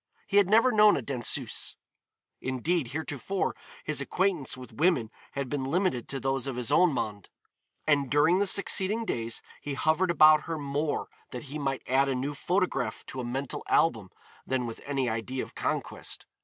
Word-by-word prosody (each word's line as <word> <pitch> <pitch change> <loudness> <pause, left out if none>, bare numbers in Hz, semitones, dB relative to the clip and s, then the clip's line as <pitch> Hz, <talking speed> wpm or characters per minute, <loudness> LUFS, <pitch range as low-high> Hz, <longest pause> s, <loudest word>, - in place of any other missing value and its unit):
He 200 - +1
had 200 -2 +5
never 230 +4 +5
known 210 -2 +6
a 135 - -3
danseuse; 125 -2 -1 0.7
indeed, 130 +4 0
heretofore, 160 +6 -2 0.3
his 150 -2 0
acquaintance 170 -3 0
with 130 -1 -11
women 150 -9 +2 0.2
had 140 -1 -3
been 140 +1 -2
limited 165 -4 0
to 135 - -4
those 135 +1 -1
of 135 - -3
his 125 -2 -2
own 180 -2 +5
monde, 105 -7 -4 0.6
and 140 -3 +2
during 155 +6 +4
the 200 - +2
succeeding 200 +3 +2
days 115 - -2 0.2
he 145 -1 -4
hovered 160 +6 +2
about 155 -2 +6
her 165 -1 -3
more 145 +1 -2 0.2
that 125 - -6
he 155 - -3
might 135 -2 -2
add 135 +2 +3
a 135 - 0
new 135 +3 -2
photograph 175 -3 -1
to 130 - -5
a - - -5
mental 130 +3 -3
album 110 -12 +2 0.3
than 130 -2 -1
with 115 -1 -7
any 135 -3 0
idea 115 +3 -2
of - - -11
conquest. - - -4
140 Hz, 175 wpm, -28 LUFS, 130-175 Hz, 0.7 s, known